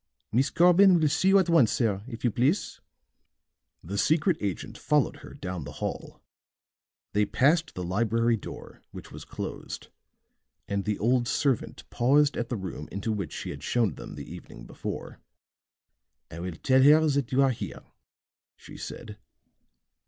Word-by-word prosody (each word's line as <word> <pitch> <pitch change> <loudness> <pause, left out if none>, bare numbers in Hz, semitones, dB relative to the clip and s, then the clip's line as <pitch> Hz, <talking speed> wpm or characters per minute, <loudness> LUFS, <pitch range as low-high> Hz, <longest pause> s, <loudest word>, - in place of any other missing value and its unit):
"Miss 130 +4 +2
Corbin 180 +1 +6
will 155 - +3
see 185 - +1
you 195 +1 +6
at 190 -3 +3
once, 160 -10 +4
sir, 105 -5 0
if 120 -2 -8
you 120 - +2
please." 130 - 0 1.0
The 100 +5 -4
secret 160 +3 +2
agent 100 -4 -4
followed - - +1
her - - -12
down 90 -3 -5
the 75 - -8
hall; - - -6 0.9
they 105 - +3
passed 150 +10 +2
the 90 - -4
library 115 +5 +1
door, 105 - -10
which - - -11
was - - -9
closed; - - -7 0.8
and 100 -1 -2
the 105 -1 -1
old 120 +2 +1
servant 135 -3 -1
paused 140 +4 +3
at 120 0 -3
the 120 - -2
room 95 -6 -7
into 100 +4 -3
which 100 -8 -3
she - - -5
had 70 - -8
shown 110 +2 +1
them - - -9
the - - -8
evening - - -11
before. - - -7 1.1
"I 85 - -8
will 90 -1 -5
tell 130 +10 +3
her 155 +3 +6
that 140 -4 0
you 135 +2 +4
are 135 - +3
here," 120 - -6 0.7
she - - -12
said. 105 -1 -8
120 Hz, 160 wpm, -27 LUFS, 100-145 Hz, 1.1 s, Corbin